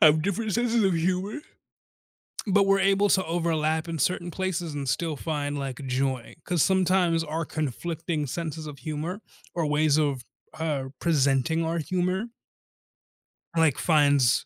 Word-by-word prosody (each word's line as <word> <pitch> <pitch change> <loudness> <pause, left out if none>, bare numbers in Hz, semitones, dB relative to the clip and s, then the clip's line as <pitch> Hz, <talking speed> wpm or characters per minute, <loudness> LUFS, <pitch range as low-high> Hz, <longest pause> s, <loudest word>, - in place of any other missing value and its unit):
have 155 0 +7
different 205 +3 -1
senses 235 0 +2
of 190 - +3
humor, 185 - -1 1.1
but 200 0 +4
we're 195 0 +4
able 195 +1 +3
to 190 - +3
overlap 160 -1 0
in 165 -1 -3
certain 175 +2 0
places 175 -4 -2
and 140 -2 -4
still 155 +5 -1
find, 145 -1 -3
like, 135 -1 -5
joy. 130 -2 -1
'Cause 175 -3 +1
sometimes 185 -3 +3
our 160 +1 -3
conflicting 155 +1 -3
senses 160 +1 -4
of 140 -2 -9
humor 155 - -4 0.3
or 170 -2 0
ways 150 0 +3
of, 140 -5 0 0.4
er, 140 -5 -2
presenting 155 +1 +2
our 165 +1 -1
humor 185 +5 -1 1.3
like 160 -5 +4
finds 145 -6 +3
160 Hz, 140 wpm, -26 LUFS, 145-180 Hz, 1.3 s, have